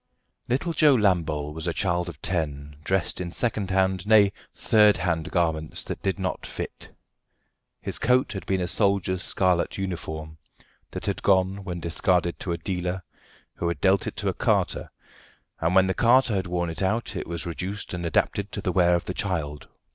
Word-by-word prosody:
Little 140 +7 0
Joe 150 -4 +5
Lambole 80 - +1
was 80 +2 -5
a 85 - 0
child 90 -2 0
of - - -10
ten, 75 -5 -2
dressed 95 0 0
in 85 -1 -4
second 105 -2 -1
hand, 95 0 +1
nay, 105 -3 +6 0.2
third 105 -2 +4
hand 80 -3 -1
garments 80 -3 -1
that - - -6
did 95 0 -1
not 95 -2 -3
fit. - - -7 0.9
His - - -4
coat 125 +2 +3
had 95 - -6
been 95 -1 +1
a 90 - -1
soldier's 100 -2 +1
scarlet 90 -3 +1
uniform, 80 -5 -5 0.5
that - - -6
had - - -1
gone 95 0 +2
when 90 -2 -4
discarded 85 +1 +1
to 90 - -3
a 85 - -1
dealer, 90 0 -3 0.5
who 85 - -3
had 85 - -2
dealt 95 -1 +3
it - - -4
to - - -1
a - - -1
carter, - - 0 0.7
and 80 +3 +1
when 95 0 +6
the 95 - 0
carter 120 +1 +4
had 95 -2 -1
worn 85 -1 -1
it 80 - -6
out 110 +5 0
it - - -4
was 85 +1 -4
reduced 95 +5 -4
and 90 -1 -4
adapted 95 +4 0
to - - -3
the 95 - -1
wear 90 -1 +4
of 85 - -2
the 90 - -3
child. 80 -7 -3
90 Hz, 185 wpm, -25 LUFS, 85-100 Hz, 0.9 s, nay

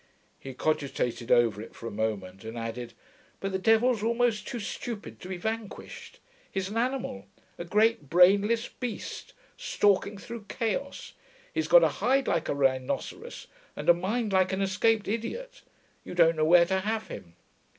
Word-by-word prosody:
He 135 -1 -9
cogitated 130 -6 -1
over 115 -4 +4
it 115 - -11
for - - -10
a 115 - -4
moment, 100 -3 -3
and 110 +1 -7
added, 115 +1 -5 0.5
'But 195 - -3
the 190 - -1
devil's 225 +2 +3
almost 230 -1 +1
too 245 - -4
stupid 220 +1 -6
to - - -9
be 190 - -4
vanquished. 225 - -6 0.3
He's 190 -1 -2
an 215 - -4
animal; 240 - -2 0.3
a 170 - -4
great 210 - +2
brainless 200 +7 +4
beast, 245 -4 -6 0.2
stalking 205 - +1
through 230 +1 -8
chaos. 250 +4 -3 0.4
He's - - -1
got - - +7
a - - +5
hide 270 +1 +2
like 165 -2 0
a - - 0
rhinoceros, 130 -2 -2 0.3
and - - -2
a - - +10
mind 205 +5 -2
like 185 0 +3
an 190 +1 0
escaped 205 +3 +1
idiot: 350 - -4 0.4
you - - -8
don't 165 -1 +5
know 155 0 +1
where 170 +2 +7
to 190 +2 0
have 220 +3 -2
him. 85 -1 -9
195 Hz, 165 wpm, -28 LUFS, 145-230 Hz, 0.5 s, a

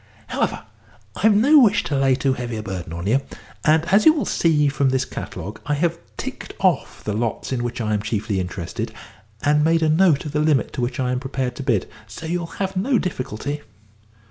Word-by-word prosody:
"However, - - -1 0.5
I've 215 +1 +4
no 280 +9 +6
wish 215 -6 +4
to 145 - -2
lay 135 -1 +3
too 135 0 +1
heavy 120 -2 -4
a 110 - -5
burden 95 -5 -5
on 85 +2 -5
you, 125 +7 +3 0.4
and, 155 +1 +4
as 210 +2 +6
you 315 - +8
will 300 - -1
see 150 -3 +2
from 140 -1 +1
this 130 0 +1
catalogue, 105 +3 -7
I 150 - +1
have 170 +2 0 0.2
ticked - - -6
off - - 0
the 105 - -2
lots 115 +3 -2
in 125 -2 -1
which 120 0 -3
I 110 -2 -1
am 105 - 0
chiefly 105 -2 -2
interested, 90 -2 -4 0.5
and 150 +1 +3
made 165 +1 +3
a 155 - +3
note 160 -2 +4
of 150 - -4
the 150 - 0
limit 150 -3 +2
to - - -3
which 120 +2 -2
I 125 -1 0
am 125 - 0
prepared 130 -2 -3
to - - -4
bid, 120 -8 +1 0.2
so - - -9
you'll 170 +1 -2
have 190 -1 -2
no 235 +8 +2
difficulty." 145 - -3
135 Hz, 215 wpm, -22 LUFS, 120-165 Hz, 0.5 s, you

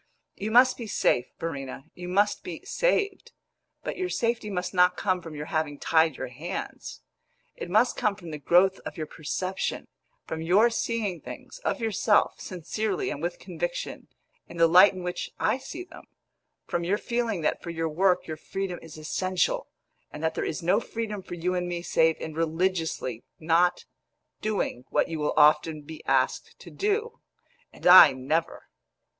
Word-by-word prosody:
You 210 - -4
must 250 +3 +5
be 235 - -6
safe, 125 -10 +1
Verena 135 -5 -5
you 180 0 -8
must 200 +3 +2
be - - -7
saved; 410 -6 0 0.5
but - - -4
your 370 -1 -2
safety 230 -7 -1
must 180 -1 -3
not 180 0 +4
come 185 -2 0
from 165 -2 -9
your 150 0 -5
having 155 -3 -2
tied 160 -2 +3
your 130 - -5
hands. 145 +8 -6 0.5
It - - -7
must 215 +7 +3
come 210 -1 +1
from 175 -5 -10
the 150 - -6
growth 185 +5 +4
of - - -8
your 155 - -3
perception; 185 +5 -3 0.4
from 160 - -5
your 200 +8 +4
seeing 225 -6 -2
things, - - -10
of 395 - -2
yourself, 220 -1 +2
sincerely 215 - -3
and - - -5
with - - -2
conviction, - - -5 0.4
in 170 - -11
the 165 - +6
light 180 +5 +7
in 185 -1 -7
which 180 0 -4
I 225 +5 +1
see 330 +6 -7
them; 360 - -14 0.6
from 170 - -2
your 190 +4 +1
feeling 235 -5 -2
that 155 - 0
for 170 - -7
your 165 -1 -2
work 180 +4 +2
your 155 -1 -5
freedom 190 +2 -4
is 160 -1 -11
essential, 185 +3 -1 0.4
and 150 - -9
that 160 0 +1
there - - -2
is 165 +2 -3
no 185 +5 +3
freedom 220 -3 -5
for 175 - -8
you 175 +2 -1
and 180 -1 -1
me 175 -1 -4
save 160 -2 +2
in 160 - -6
religiously 160 -6 -1 0.2
not 170 +2 +2 0.6
doing 210 - -2
what - - +1
you 165 -1 -4
will 150 - 0
often 150 0 +4
be 155 +1 -10
asked 130 -1 +1
to - - -13
do 435 +3 -1 0.5
and - - -14
I 180 -5 +10
never!" 140 +6 -2
180 Hz, 175 wpm, -27 LUFS, 160-210 Hz, 0.6 s, I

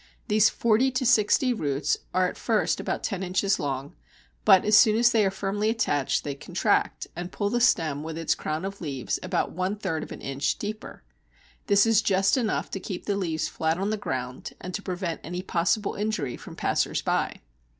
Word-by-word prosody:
These 215 0 +5
forty 235 +3 +2
to 255 0 0
sixty 245 +2 +4
roots 145 - 0 0.2
are 185 0 +2
at - - -6
first 220 -2 0
about - - -3
ten 195 -2 -2
inches 190 +2 +1
long, 135 -1 -3 0.5
but, 190 - +6
as 210 - +5
soon 220 -1 +6
as 240 +1 +5
they 225 -2 +3
are 195 - +3
firmly 200 +2 -1
attached, 145 - 0
they 145 - -3
contract, 140 - 0
and 175 +1 -5
pull 205 -1 -2
the 240 - +1
stem 155 - +2
with 160 +1 -6
its 165 -1 +1
crown 155 +4 -3
of 195 +1 -6
leaves 140 -6 -3
about - - -1
one 185 +3 -2
third 185 -7 -3
of - - -8
an - - -8
inch 135 +2 -1
deeper. 215 +1 -7 0.6
This 200 0 +5
is 225 -1 +4
just 195 -1 +2
enough 235 -5 -1
to 195 - -3
keep 185 -1 -6
the 205 - 0
leaves 165 -5 -1
flat 160 +1 -1
on 195 +3 -1
the - - +1
ground 130 -10 -5
and 185 - -7
to 200 - -3
prevent 180 -3 -4
any 180 +1 -5
possible 190 +4 0
injury 200 - -2
from - - -11
passers - - 0
by. - - -1
195 Hz, 200 wpm, -26 LUFS, 160-215 Hz, 0.6 s, but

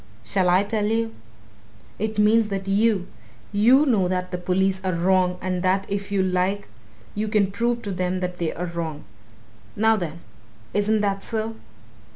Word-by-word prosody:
Shall 185 -2 +1
I 185 +2 +4
tell 210 0 -1
you? 225 +1 0 0.9
It 220 0 -2
means 215 +1 +4
that 195 -1 -4
you 200 -1 +2 0.5
you! 240 +8 +5
know 215 -9 +2
that 180 0 -2
the 180 - -3
police 190 +1 +1
are 185 -1 0
wrong, 180 +1 +2
and 185 -1 -1
that 190 +1 +1
if 200 0 -3
you 195 -2 +2
like 185 +2 0 0.5
you 215 +1 -2
can 210 -2 +2
prove 235 +3 -1
to 205 - -4
them 185 0 -1
that 180 -1 -4
they 170 -2 0
are 175 - -4
wrong! 165 -3 -5 0.7
Now, 220 +1 +3
then 170 -3 -5 0.5
isn't 210 +1 +2
that 200 -1 0
so?" 225 +1 -2
195 Hz, 170 wpm, -24 LUFS, 180-215 Hz, 0.9 s, you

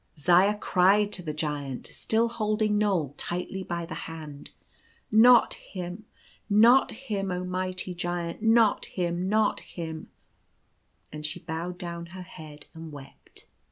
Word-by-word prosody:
Zaya 180 +7 +4
cried 200 +2 +3
to 180 - 0
the 160 -3 -4
Giant, 150 -4 -4
still 225 +1 0
holding 215 -2 0
Knoal 180 -10 +1
tightly 180 +2 -3
by 170 -2 -4
the 165 - -7 0.2
hand: 155 -3 -9 0.4
" - - -34 0.2
Not 245 -2 +6
him, 180 +2 -7 0.4
not 230 +6 +6
him 210 -6 -4
f 180 - -1
Oh, 180 - -4
mighty 185 0 -3
Giant! 175 +1 -3
not 225 -1 +4
him! 175 0 -2
not 215 0 +2
him 160 -2 -7 1.0
I" - - -6
and 150 - -8
she 150 0 -3
bowed 170 +2 -5
down 170 -2 -6
her 185 +2 -9
head 155 -4 -11
and 160 -1 -9
wept. 140 -2 -12
180 Hz, 150 wpm, -27 LUFS, 165-210 Hz, 1.0 s, Not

